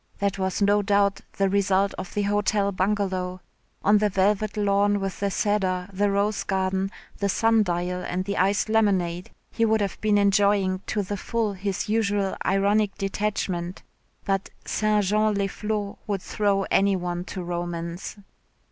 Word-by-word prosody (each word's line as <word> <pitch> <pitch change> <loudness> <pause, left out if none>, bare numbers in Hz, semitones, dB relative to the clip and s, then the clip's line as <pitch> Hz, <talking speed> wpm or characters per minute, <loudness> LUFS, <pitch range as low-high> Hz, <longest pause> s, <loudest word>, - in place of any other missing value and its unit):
That 200 -1 -1
was 190 +1 0
no 205 +1 +4
doubt 200 0 +2 0.2
the 195 - +3
result 195 0 +2
of 185 - -7
the 205 - +1
Hotel 205 0 +1
Bungalow. 185 -2 -1 0.4
On 205 +1 +5
the 210 0 +2
velvet 205 +2 +1
lawn 205 0 +2
with 195 -1 -4
the 200 - 0
cedar, 190 -2 0
the 205 +2 +1
rose 200 +1 0
garden, 190 0 0 0.3
the 200 - 0
sun 225 +2 +3
dial 180 -1 -1
and 185 +1 -2
the 200 0 -2
iced 195 +3 +2
lemonade, 190 -6 +1 0.2
he 230 - 0
would 220 -1 +3
have 200 -3 -3
been 210 -1 +3
enjoying 200 -2 +3
to 210 -1 -1
the 205 +2 -4
full 225 0 -1
his 195 0 -3
usual 205 -3 0
ironic 200 +1 +2
detachment, 195 -3 -2 0.4
but 195 -1 -1 0.2
St. 215 -1 +1
Jean 215 +2 +2
les 200 0 +1
Flots 210 0 -3
would 200 -3 -2
throw 200 -2 +1
any 200 0 +4
one 175 -1 -3
to 185 0 -6
romance. 175 +1 -4
200 Hz, 160 wpm, -25 LUFS, 190-205 Hz, 0.4 s, On